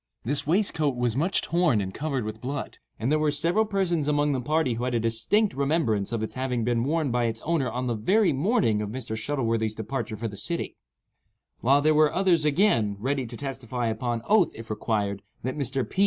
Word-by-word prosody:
This 140 +3 0
waistcoat 160 -6 +2
was 120 -2 0
much 170 +8 +1
torn 170 -9 +2
and 95 -1 -4
stained 140 -6 -2
with 110 +1 -6
blood, 135 +2 -5 0.2
and 120 +5 -1
there 155 - +3
were 155 -1 +2
several 170 +9 +1
persons 185 -7 0
among 145 0 +2
the 130 -3 -1
party 155 -1 +1
who 115 +2 -4
had 125 -1 -1
a - - +2
distinct 115 - +2
remembrance 135 -8 0
of 115 -2 -2
its 110 - -4
having 130 -2 -2
been 115 0 +1
worn 150 0 0
by 120 0 +1
its 115 -1 -1
owner 155 -6 0
on 125 +1 -3
the 120 - 0
very 190 - +2
morning 130 - +1
of 105 - -3
Mr. 115 -1 -5
Shuttleworthy's 115 -3 -1
departure 110 0 -4
for 115 +2 -3
the 105 - -7
city; 170 - -3 0.8
while 140 +4 +3
there 155 0 +4
were 155 0 +4
others, 180 -5 +2
again, 140 - +2
ready 130 +3 -1
to 120 +1 -8
testify 125 -3 -3
upon 115 +1 -2
oath, 205 -4 +4
if 115 0 -8
required, 105 -2 -1 0.2
that 130 +2 -2
Mr. 135 -2 -2
P. - - -7
130 Hz, 210 wpm, -26 LUFS, 115-155 Hz, 0.8 s, there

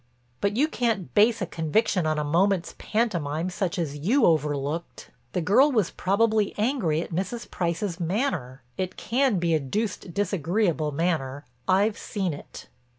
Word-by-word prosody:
"But 200 +2 0
you 295 +4 +4
can't 230 - -1
base 220 0 +4
a - - 0
conviction 170 +2 0
on 155 -1 +1
a 150 - 0
moment's 180 +4 +1
pantomime 175 -7 -1
such 190 0 -2
as 155 -5 -2
you 225 - +3
overlooked. 150 0 -1 0.2
The 180 - 0
girl 245 - +5
was 215 -9 +1
probably 215 +2 +1
angry 210 - +1
at - - -11
Mrs. 195 +7 -3
Price's 175 +1 -2
manner. 170 - -2 0.2
It 185 -1 -3
can 250 -2 +1
be 170 -1 +1
a 160 - +3
deuced 185 - -3
disagreeable 175 -3 0
manner; 145 -3 -1 0.2
I've 200 +3 +2
seen 190 -6 -2
it." 145 - -10
185 Hz, 150 wpm, -26 LUFS, 160-215 Hz, 0.2 s, girl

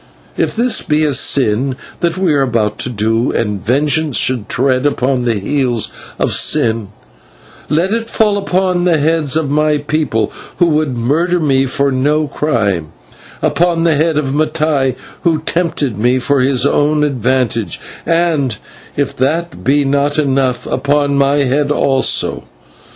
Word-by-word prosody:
If - - -1
this 235 0 +1
be 155 +1 +1
a 145 - 0
sin 130 0 +1 0.2
that 170 0 -1
we 185 -4 +1
are 140 - +2
about 115 -5 0
to - - -2
do, 115 +1 0
and 105 -4 -2
vengeance 145 +4 +1
should 120 -5 0
tread 130 0 +1
upon 130 -3 0
the 115 -2 +1
heels 120 +2 -1 0.2
of - - 0
sin, 110 -2 +2 0.8
let 170 +8 +1
it 230 0 -2
fall 210 -2 +1
upon 185 -2 0
the 170 -3 +3
heads 155 -1 +1
of 155 -3 -1
my 150 0 +2
people, 145 -6 -1 0.2
who 175 - +4
would 150 -5 0
murder 165 +9 +1
me 135 -4 +1
for 140 +2 0
no 145 +4 +1
crime; 105 - -1 0.6
upon 170 -1 +1
the 165 -1 +3
head 155 +1 +1
of 135 -3 -1
Mattai, 150 -3 0 0.3
who 160 -2 0
tempted 155 - -2
me 125 +3 +2
for 140 +2 +1
his 130 0 +2
own 150 +1 +2
advantage; 125 - -1 0.2
and, 165 -8 0 0.4
if - - -1
that 165 +6 -2
be 145 +1 +2
not 140 +2 +1
enough, 130 -4 0
upon 140 +2 0
my 140 +1 +2
head 140 +2 0
also. 135 -2 +1
140 Hz, 150 wpm, -15 LUFS, 125-155 Hz, 0.8 s, who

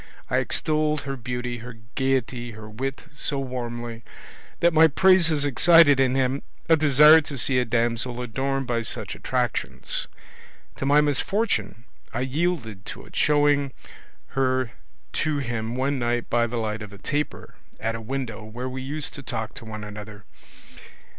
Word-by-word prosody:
I - - +3
extolled 155 -1 0
her 135 0 -4
beauty, 125 0 -4
her 120 0 -9 0.2
gaiety, 130 -3 -1
her 105 0 -10
wit, 135 +5 -4
so 150 -1 -2
warmly, 120 -3 -5 0.6
that 170 0 +4
my 160 +1 +7
praises 165 -2 +4
excited 145 0 +6
in 130 -1 +3
him 135 +1 +1 0.3
a 165 - +6
desire 150 +1 +7
to 145 -2 -7
see 125 +1 +2
a 125 - +1
damsel 120 +1 0
adorned 135 +3 -2
by 120 -1 0
such 110 - -5
attractions. - - -2 0.7
To 135 - -2
my 145 +1 +6
misfortune 145 - 0 0.3
I 120 - -2
yielded 130 - -1
to - - -7
it, - - -15
showing 145 -2 +3 0.6
her 130 -2 0 0.4
to 155 -1 0
him 120 -3 -3
one 135 +2 0
night 120 0 -1
by 120 0 +3
the 120 +1 -4
light 110 -1 -2
of 105 -1 -8
a 100 - -11
taper 150 +8 -3 0.3
at 110 +1 -1
a 115 - -5
window 115 -2 -4
where 120 +4 -6
we 130 0 -5
used 145 +3 -3
to 145 - -8
talk 110 -4 -4
to - - -9
one 110 -1 -7
another. 105 0 -9
130 Hz, 160 wpm, -25 LUFS, 115-145 Hz, 0.7 s, my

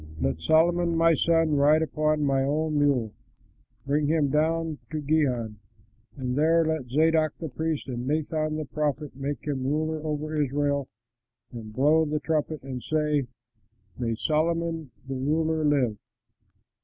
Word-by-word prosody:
Let 70 +3 -1
Solomon 170 - +3
my 165 0 +5
son 165 -1 +2
ride 150 +3 +4
upon 155 -1 0
my 135 -1 +2
own 150 +2 0
mule, 130 -7 +1 0.7
bring 145 +1 +1
him 155 -2 +2
down 160 +1 0
to 155 - -3
Gihon, 130 -8 0 0.6
and 125 -2 -2
there 165 +3 +3
let 155 -6 -2
Zadok 155 +2 +2
the 160 - -5
priest 160 +2 -3
and 125 -1 -4
Nathan 155 +1 -1
the 155 0 -3
prophet 150 -1 -3
make 140 +2 -4
him 140 -3 -2
ruler 155 +3 -1
over 155 0 -3
Israel 140 0 0 0.6
and 115 -3 -8
blow 150 +7 +3
the 150 0 -1
trumpet 155 -1 -2
and 130 -2 -6
say, 150 -3 0 0.7
'May 115 -2 -2
Solomon 165 +2 -1 0.2
the 135 - -4
ruler 155 +4 0
live!' 135 -8 +2
150 Hz, 145 wpm, -26 LUFS, 135-160 Hz, 0.7 s, my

